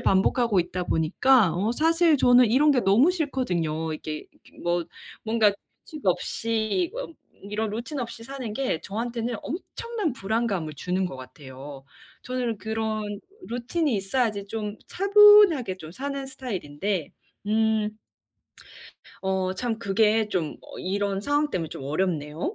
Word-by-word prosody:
반복하고 200 +1 +3
있다 180 +1 -3
보니까 185 +5 +3
어 205 +6 0
사실 325 +1 +3
저는 245 -1 +6
이런 290 +6 +5
게 260 -4 +3
너무 230 - +5
싫거든요. 175 - -1
이게 155 0 -6
이렇게 175 -1 -4 0.4
뭔가 220 -2 +3 0.3
규칙 305 -6 -10
없이 225 - 0
어 - - -4 0.4
이런 215 +1 -2
루틴 240 +7 -5
없이 230 -1 -6
사는 255 -3 -6
게 255 -9 -1
저한테는 230 +2 -3
엄청난 390 - -4
불안감을 195 - -2
주는 185 +5 -1
것 135 - -7
같아요. 135 +1 -10 0.4
저는 250 -3 -2
그런 215 -1 -3 0.3
루틴이 250 +5 -1
있어야지 205 0 -1
좀 210 0 -4
차분하게 400 - +6
좀 155 -2 -9
사는 275 +5 -4
스타일인데 195 - -4 0.4
음 215 0 +1 1.3
어 190 -1 0
참 230 0 -2
그게 215 +1 +2
좀 170 -7 -2
어 - - -11
이런 200 +1 -1
상황때문에 290 - 0
좀 135 - -8
어렵네요. 155 - -2
220 Hz, 275 characters per minute, -25 LUFS, 185-260 Hz, 1.3 s, 저는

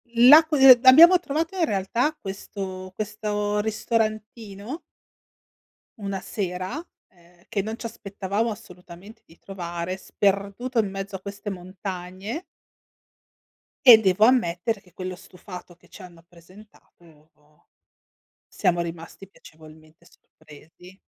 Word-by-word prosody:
L'a 275 +7 +8
qu 310 -1 -2
ehm, 260 -2 +9
abbiamo 330 +8 +9
trovato 325 +3 -3
in 345 - +1
realtà 230 +8 -1
questo 190 -1 -7
questo 210 -1 -3
ristorantino 215 - -3 1.2
una 195 -1 -4
sera, 185 - -5 0.3
ehm, 175 -2 -25
che 200 - -2
non 220 +3 -6
ci - - -9
aspettavamo 200 +1 -3
assolutamente 185 -1 -12
di 165 - -21
trovare, 175 -1 -6
sperduto 200 +6 -1
in 205 -3 0
mezzo 195 0 -6
a 185 - -7
queste 200 +1 -7
montagne 185 - -7 1.4
e 235 -3 +11
devo 190 +1 +2
ammettere 220 -3 +2
che 180 -3 -25
quello 185 0 -6
stufato 180 -1 -12
che - - -26
ci 205 - -14
hanno 170 -2 -14
presentato 170 -3 -20 1.2
siamo 175 -1 0
rimasti 170 +3 -8
piacevolmente 155 -2 -18
sorpresi. 165 +5 -18
195 Hz, 115 wpm, -24 LUFS, 180-220 Hz, 1.4 s, e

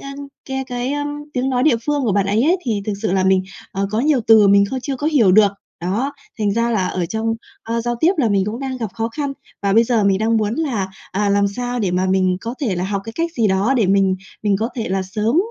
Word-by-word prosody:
a, 275 0 -7 0.3
cái 265 0 -3
cái, 245 +1 -3
a, 290 0 -2 0.3
tiếng 260 +1 -1
nói 250 -1 +1
địa 300 -5 +4
phương 290 -2 +1
của 220 -5 +1
bạn 200 -1 +1
ấy 210 +4 +2
ấy, 340 +6 +3
thì 215 -5 -1
thực 210 - -1
sự 215 - 0
là 190 -1 +2
mình, 190 0 +3 0.3
ờ, 195 +1 -1
có 215 +2 0
nhiều 280 -1 +2
từ 220 -3 +7
mình 200 0 +6
không 260 -1 -2
chưa 270 0 -3
có 295 - -3
hiểu 245 -12 +4
được. 205 0 +5 0.3
Đó, 220 +11 -1 0.3
thành 205 -2 +1
ra 230 +2 +1
là 195 -5 +1
ở 180 -2 -2
trong, 225 +3 -1 0.3
a, 230 +1 -2
giao 240 +1 -1
tiếp 345 +4 +4
là 240 -6 +3
mình 195 -2 +2
cũng 225 +5 -4
đang 265 -1 -3
gặp 225 -4 -3
khó 225 0 -2
khăn. 285 +3 -3 0.3
Và 200 - +1
bây 230 +3 +5
giờ 225 -3 +1
mình 195 -1 +3
đang 225 +2 +1
muốn 215 0 0
là, 240 -11 -1 0.2
à, 205 +1 0
làm 200 0 +3
sao 245 +3 -3
để 200 -5 0
mà 185 +1 +1
mình 185 -1 +2
có 230 +4 -5
thể 220 -9 0
là 180 +1 -2
học 200 0 -2
cái 225 - -7
cách 335 +4 -2
gì 230 -8 +1
đó 195 +8 +2
để 225 -5 +3
mình 190 -1 +3 0.3
mình 205 -2 +2
có 225 +2 -1
thể 230 - -2
là 190 0 0
sớm, 215 +7 -1
220 Hz, 275 wpm, -19 LUFS, 195-250 Hz, 0.3 s, từ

